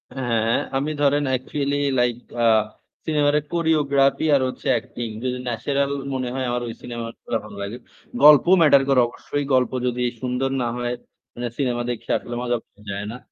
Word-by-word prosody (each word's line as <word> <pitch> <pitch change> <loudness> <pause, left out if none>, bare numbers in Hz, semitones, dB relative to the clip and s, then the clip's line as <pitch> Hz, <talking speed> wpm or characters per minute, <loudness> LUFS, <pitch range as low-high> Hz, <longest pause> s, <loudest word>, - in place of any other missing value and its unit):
হ্যাঁ, 120 -4 0
হ্যাঁ। 115 - +2 0.2
আমি 145 +3 -1
ধরেন 145 +1 +3
অ্যাকচুয়ালি 140 +2 -1 0.2
লাইক 120 -1 +2 0.3
আ - - +4 0.6
সিনেমার 150 -2 +2
ওই - - -10
কোরিওগ্রাফি 150 -4 +2
আর 135 - +3
হচ্ছে 130 - -6
অ্যাক্টিং 120 -1 -3 0.2
যদি 125 0 -1
ন্যাচারাল 140 +4 -1 0.2
মনে 130 -1 -2
হয় 130 -1 -2
আমার 120 0 -1
ওই 115 - -5
সিনেমাগুলা 115 -1 -5
ভাল 105 -1 -11
লাগে। 100 +4 -5 0.5
গল্প 150 +1 +9 0.2
ম্যাটার 140 -3 +6
করে 135 -2 +5
অবশ্যই। 145 +4 -4
গল্প 125 -2 +3 0.2
যদি 125 0 -2 0.2
সুন্দর 130 +1 -1
না 120 - 0
হয় 120 0 -2 0.4
মানে 120 0 -4
সিনেমা 125 -4 0
দেখে 120 - -7
আসলে 120 - -7
মজা 120 -1 0
পাওয়া - - -25
যায় 100 +1 -4
না। 125 - -7
125 Hz, 175 wpm, -23 LUFS, 120-140 Hz, 0.6 s, গল্প